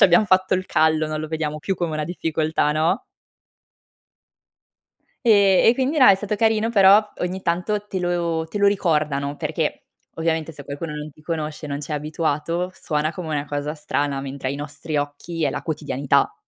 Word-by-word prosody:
c'abbiam 195 0 +6
fatto 185 0 +3
il 185 0 -1
callo, 155 0 +2
non 155 0 -3
lo 155 - -5
vediamo 155 -1 -3
più 190 +5 -2
come 170 -2 -2
una 155 0 -2
difficoltà", 160 -2 0
no? 155 +2 +1 2.2
Ehm, 200 -4 +5
e 235 - +6
quindi 270 +4 0
no, 255 - +7
è 200 - +9
stato 205 +2 -3
carino, 220 +1 +2
però 205 0 +5
ogni 185 +1 -3
tanto 195 +5 -1
te 190 - -3
lo 170 -2 -1
te - - -7
lo 200 0 +3
ricordano 150 -7 +1
perché, - - -3 0.3
ovviamente 160 -1 -1
se 145 -2 -11
qualcuno 150 +3 -5
non 150 0 -6
ti 145 - -21
conosce, 155 -1 -4
non 140 -1 -3
c'è 150 +1 -6
abituato, 155 +3 -1
suona 155 -1 -2
come 180 -4 -6
una 145 -2 -1
cosa 145 +1 -3
strana, 145 -2 -2
mentre 135 -1 -4
ai 140 - -2
nostri 150 +2 -5
occhi 145 +3 -3
è 140 - +1
la 145 - -3
quotidianità. 145 -4 0
160 Hz, 180 wpm, -22 LUFS, 150-185 Hz, 2.2 s, è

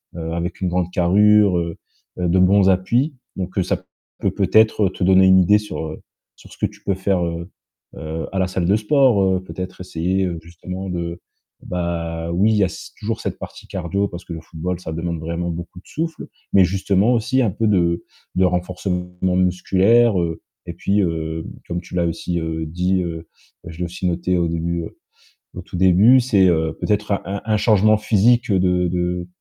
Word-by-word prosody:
heu, 80 -1 -4
avec 85 +2 -4
une 90 - 0
grande 90 0 -1
carrure, 100 +2 +4
heu, 85 -1 -3 0.4
heu, 90 - 0
de 90 +2 +3
bons 95 +1 +5
appuis 120 - +1 0.2
donc 95 0 -5
heu, 95 - +3
ça 95 0 -2 0.4
peut - - +1
peut-être 110 -2 +3
te 95 - -5
donner 95 +1 +5
une 95 0 +6
idée 95 +3 +5
sur, 105 -5 -5
heu, 80 - -8 0.3
sur - - -17
ce - - -16
que - - 0
tu - - -18
peux 100 - 0
faire, 95 -1 0
heu, 85 +1 -5 0.5
heu, 80 +1 -5
à 95 - -4
la 95 - +2
salle 95 -1 -2
de 100 - +4
sport, 120 +1 +3
heu, 95 -1 +1
peut-être 90 0 -7
essayer, 90 +2 -1
heu, 85 -2 -3
justement 90 +3 -7
de 85 -1 -4 0.4
bah, 85 -2 -3
oui, 100 +5 +3
il 110 - +2
y 105 - +4
a - - 0
c - - -9
toujours - - -3
cette - - -4
partie - - -10
cardio 95 +3 -2
parce 85 0 -9
que 85 - -7
le 80 - -7
football, 85 +2 -5
ça 80 - -6
demande 85 +1 -3
vraiment 85 +2 -3
beaucoup 85 +2 -7
de - - -21
souffle, 160 0 -4 0.2
mais 95 -2 +6
justement 95 +4 +1
aussi 125 +3 +1
un 115 -6 +1
peu 110 +4 -1
de 85 -4 +1 0.3
de 95 +1 +3
renforcement 90 0 -2 0.3
musculaire, 95 +4 +3
heu, 85 -1 -3 0.2
et 85 - -6
puis, 100 +4 0
heu, 80 -2 -2 0.2
comme 85 0 -3
tu 90 - -10
l'as 85 -1 +1
aussi, 85 +1 -2
heu, 80 0 -3
dit, 90 +3 0
heu, 80 -1 -6 0.4
je 85 0 -10
l'ai 90 - -1
aussi 90 +1 -4
noté 90 +1 0
au 85 -1 +1
début, 85 +1 -2
heu, - - -10 0.6
au 90 - -7
tout 90 - -10
début, 95 +8 +6
c'est, 105 -6 +3
heu, 80 -2 +1
peut-être 105 -1 -1
un 100 - -1
un 100 +1 -4
un 110 -1 +1
changement 110 0 +4
physique 115 +3 +3
de 90 -2 +2
de, 90 0 -2
90 Hz, 205 wpm, -20 LUFS, 85-100 Hz, 0.6 s, une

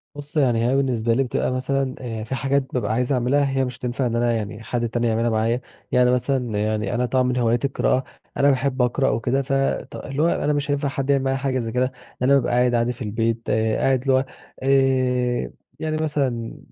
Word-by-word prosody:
بُص 145 +1 -7
يعني 120 -5 +3
هي 130 - +2
بالنسبة 120 -4 +1
لي 135 +4 +2
بتبقى 125 0 -1
مثلًا 130 +1 -1
آآ، 115 -3 -5
في 115 +4 -4
حاجات 135 +1 +1
بابقى 115 -4 0
عايز 125 +3 0
أعملها 135 +3 +2
هي 135 - +2
مش 125 -1 -6
هتنفع 125 +1 -2
إن 115 -1 -1
أنا 120 0 +2
يعني 110 0 -4
حد 120 0 -2
تاني 120 +1 0
يعملها 115 +1 +1
معايا. 115 +2 +1 0.3
يعني 125 0 +4
مثلًا 125 -3 0
يعني 110 +1 -1
أنا 125 +1 +1
طبعًا 130 +1 +1
من 125 0 0
هواياتي 120 +2 +2
القراءة، 130 -1 +1 0.3
أنا 140 0 +4
باحب 135 -1 +1
أقرأ 125 +2 +2
وكده 125 +4 0
ف 135 +1 -3 0.4
ط - - -9
اللي 140 +1 -4
هو - - +4
أنا 150 -3 +1
مش 145 0 -1
هينفع 145 0 0
حد 135 0 -3
يعمل 140 -1 +3
معايا 135 0 0
حاجة 135 -1 -1
زي 115 -2 -3
كده، 125 +2 0 0.3
أنا 130 +2 +4
بابقى 135 - +1
قاعد 125 0 +3
عادي 120 +1 +1
في 125 - -11
البيت، 115 +1 -1
قاعد 110 +4 +1
اللي 135 0 +1
هو 130 +1 +3 0.4
آآ، 130 -2 +2 0.3
يعني 155 0 -2
مثلًا 135 -7 -2
125 Hz, 215 wpm, -22 LUFS, 115-135 Hz, 0.4 s, يعني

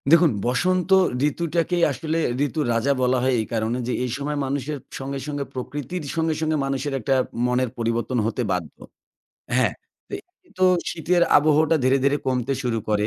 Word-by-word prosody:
দেখুন, 165 0 +6
বসন্ত 180 +8 +1 0.4
ঋতুটাকেই 170 +2 -1
আসলে 155 +5 -2 0.3
ঋতুর 150 +1 -2
রাজা 115 +5 +2
বলা 125 0 +3
হয় 130 0 +2
এই - - -4
কারণে 115 +2 0
যে, 125 - -1
এই 125 - -2
সময় 145 +1 -3
মানুষের 140 +2 -2 0.2
সঙ্গে, 135 +1 -4
সঙ্গে 145 -1 -2
প্রকৃতির 145 +7 -5
সঙ্গে, 160 -1 +1
সঙ্গে 155 -1 +1
মানুষের 135 +1 -2
একটা 135 +3 +1 0.3
মনের 125 0 +1
পরিবর্তন 115 +2 -1
হতে 115 +3 -1
বাধ্য। 90 -4 -3 0.8
হ্যাঁ, - - +3 0.4
তো, - - -4 0.4
তো 185 - +4 0.3
শীতের 175 +2 +1
আবহটা 155 +2 +4
ধীরে, 130 +1 +4
ধীরে 140 +1 +3
কমতে 130 0 0
শুরু 120 -3 0
করে 105 -1 +1
140 Hz, 160 wpm, -23 LUFS, 125-160 Hz, 0.8 s, দেখুন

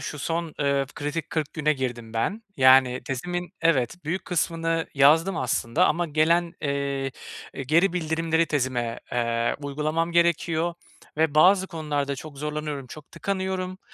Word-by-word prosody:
şu 150 - -6
son, 165 +2 -3
ııı, 140 -1 +1
kritik 145 +3 -4
40 155 -3 -2
güne 155 -1 +2
girdim 120 -5 -4
ben. 190 - -1
Yani 130 -1 +5
tezimin, 175 +8 -4
evet, 165 0 +1
büyük 170 +5 -2
kısmını 165 -1 -1
yazdım 160 +6 +5
aslında 120 -3 +1
ama 175 +2 +1
gelen, 165 +3 +2
eee, 140 -1 -1 0.4
eee, 135 - -4
geri 165 +8 +3
bildirimleri 165 -1 0
tezime, 125 -6 -1
eee, 115 -1 0
uygulamam 155 +4 -1
gerekiyor 170 0 +2 0.4
ve 155 -1 +1
bazı 185 +4 +5
konularda 150 -5 -2
çok 145 0 -10
zorlanıyorum, 150 -2 -4
çok 150 +3 -12
tıkanıyorum 190 0 -3
155 Hz, 140 wpm, -25 LUFS, 140-170 Hz, 0.4 s, Yani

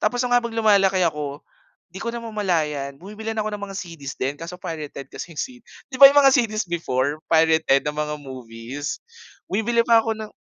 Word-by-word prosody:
Tapos 245 +4 +1
nung 245 - -1
habang 235 -2 +1
lumalaki 195 -4 +4
ako 150 -3 -3 0.5
di - - -7
ko 235 - -2
namamalayan 165 -12 -2
bumibili 210 +4 -7
na 220 - -2
ako - - -1
ng 205 - -7
mga 195 - -7
CD's 160 -6 -8
din 135 +2 -1
kaso 170 +4 -8
pirated 150 -5 -6
kasi 170 - -8
yung 150 - -12
C - - -1 0.4
'di 270 - -11
ba 275 0 +12
yung 285 - +4
mga 270 -2 +6
CD's 215 -5 +1
before 150 -3 -1
pirated 160 -4 +3
na 150 - -1
mga 150 0 -2
movies, 130 0 -7 0.5
bumibili 230 +3 +1
pa 230 -1 +6
ako 225 0 -1
ng 215 -1 -7
175 Hz, 195 wpm, -23 LUFS, 145-220 Hz, 0.5 s, ba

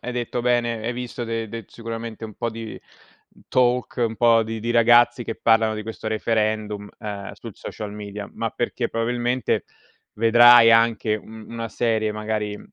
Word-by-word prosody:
hai 125 - -5
detto 120 0 -3
bene, 120 -2 0
hai 120 - -1
visto 125 0 -6
de 115 -1 -3
de 115 -2 -7
sicuramente 115 -1 -7
un 110 -2 -9
po' 120 -1 -3
di 115 0 -8 0.7
talk, 125 0 +1
un 115 0 -3
po' 115 -1 +4
di 110 0 -5
di 115 +2 -2
ragazzi 120 +1 +5
che 115 - -5
parlano 115 -1 +3
di 105 - -6
questo 110 0 -6
referendum, 110 -2 -1
uhm, 100 -2 -6
sui - - -9
social 105 -1 -7
media 105 -1 -7
ma 115 -1 -2
perché 120 +1 -2
probabilmente 120 +2 -1 0.5
vedrai 115 +1 +7
anche, 115 -1 +3
mhmm, 110 +1 -12
una 115 -1 -5
serie, 110 -1 0
magari 105 -1 -3
115 Hz, 165 wpm, -23 LUFS, 110-120 Hz, 0.7 s, vedrai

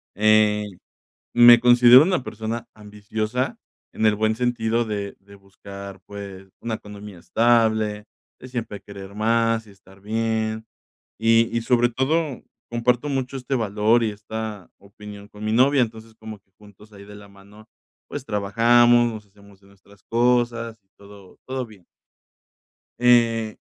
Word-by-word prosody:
Ey, 105 -2 +2 0.6
me 120 0 +8
considero 120 +1 +7
una 180 -3 0
persona 115 0 -6
ambiciosa 110 +4 -4 0.3
en 110 - 0
el 105 - +3
buen 110 +1 0
sentido 120 -1 -1
de 100 -2 -5
de 100 +1 -18
buscar, 100 0 -12
pues, 100 -2 -10
una 115 -1 -4
economía 105 -2 -10
estable, 110 0 +1 0.4
de - - -11
siempre 115 -5 -6
querer 100 -1 -11
más, 115 +1 +1
y - - -16
estar 95 0 -20
bien, 110 +1 -2 0.6
y 115 +1 +2
y 115 - 0
sobre 120 0 +2
todo 140 +3 -1 0.3
comparto 120 +4 0
mucho 135 -1 -3
este 130 +1 -5
valor 110 +1 +1
y 110 - -1
esta 105 -1 -7
opinión 100 +1 -13
con 105 0 -13
mi 110 - -1
novia. 130 +4 +3
Entonces 110 -1 -9
como 110 -1 -10
que 95 - -47
juntos 105 +1 -18
ahí 100 0 -13
de 105 0 -13
la 100 0 -13
mano, 100 +2 -18 0.4
pues, 145 -2 -7
trabajamos, 120 +3 +3
nos 110 -2 -9
hacemos 100 0 -20
de 100 - -24
nuestras 100 +1 -22
cosas, 120 -1 0
y - - -46
todo 100 -2 -16
todo 130 -1 -4
bien. 105 -6 -18 1.1
Eh, 115 -3 +3
110 Hz, 145 wpm, -22 LUFS, 100-120 Hz, 1.1 s, me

